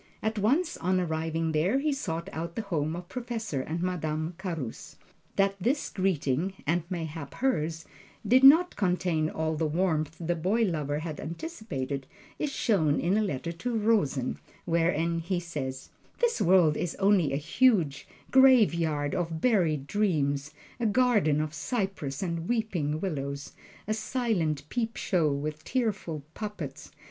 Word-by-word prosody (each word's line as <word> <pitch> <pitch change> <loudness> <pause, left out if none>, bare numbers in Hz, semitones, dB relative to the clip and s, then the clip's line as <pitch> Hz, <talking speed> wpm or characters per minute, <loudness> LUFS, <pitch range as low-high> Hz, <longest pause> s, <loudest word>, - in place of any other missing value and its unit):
At 220 0 -1
once 290 - +2
on 185 +1 +1
arriving 160 -1 -1
there, 165 +10 +2
he 290 +1 +1
sought 170 -10 -3
out 170 +2 -4
the 225 - -2
home 160 -5 -1
of 175 0 -7
Professor 230 - -3
and 165 +5 -3
Madame 160 -2 -2
Carus. 165 - -5 0.4
That 195 0 +3
his 275 +6 +1
greeting 185 -2 0
(and 170 +4 +2
mayhap 160 -5 -5
hers) 165 - -1 0.4
did 255 +5 +5
not 320 +6 +8
contain 180 -5 +1
all 160 0 -1
the 155 +1 0
warmth 160 -2 0
the 175 0 0
boy 190 +8 +1
lover 150 -7 -1
had 155 -1 -5
anticipated 150 - -5 0.3
is 300 - -1
shown 165 - +2
in 180 +4 +1
a 215 - +3
letter 170 -5 -2
to 230 +8 -3
Rosen, 150 - +1 0.3
wherein 170 0 +1
he 175 +2 -1
says: 135 -6 -5 0.3
"This 475 -1 +1
world 175 -4 +5
is 175 - -2
only 195 -7 +3
a - - 0
huge 160 - +2 0.2
graveyard 170 - +4
of 165 -2 -2
buried 165 - +2
dreams, 150 -7 0 0.3
a 235 - +1
garden 210 - +3
of 155 0 -2
cypress 190 - -3
and 170 -2 -3
weeping 180 -11 0
willows, 140 -6 -4 0.3
a 215 - +1
silent 200 - -1
peep 230 -1 -2
show 165 -6 +1
with 150 +2 -3
tearful 205 - -2
puppets. 195 -11 -6
170 Hz, 145 wpm, -28 LUFS, 155-210 Hz, 0.4 s, not